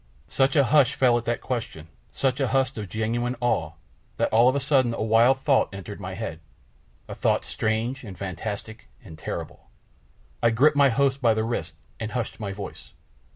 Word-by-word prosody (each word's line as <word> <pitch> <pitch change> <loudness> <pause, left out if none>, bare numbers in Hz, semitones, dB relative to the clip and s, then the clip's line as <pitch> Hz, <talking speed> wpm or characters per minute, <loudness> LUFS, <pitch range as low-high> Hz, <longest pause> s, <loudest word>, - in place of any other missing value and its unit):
Such 135 +8 +2
a 140 - +6
hush 140 -1 +4
fell 125 -2 +4
at 115 - -10
that 120 0 -1
question, 115 -11 -4 0.2
such 135 0 0
a 135 - +1
hush 135 0 +1
of 105 -4 -6
genuine 120 +4 -1
awe, 85 -10 0 0.4
that - - 0
all 120 +3 +6
of 130 - 0
a - - +2
sudden 130 -4 +2
a - - -2
wild 115 +4 +4
thought 135 -1 +3
entered 100 +1 -8
my 95 -1 -6
head, 95 -7 -5 0.7
a - - -6
thought - - 0
strange 115 +5 -2
and 95 -5 -9
fantastic 100 +4 -6 0.2
and 85 -7 -11
terrible. 80 - -7 0.7
I 115 - +4
gripped 140 +6 +4
my 140 -1 +5
host 135 +2 +1
by 115 -3 +4
the 110 - 0
wrist 100 -8 -3 0.3
and 110 0 -5
hushed 125 -3 -3
my 100 -3 -4
voice. 100 +1 -9
115 Hz, 190 wpm, -25 LUFS, 105-130 Hz, 0.7 s, a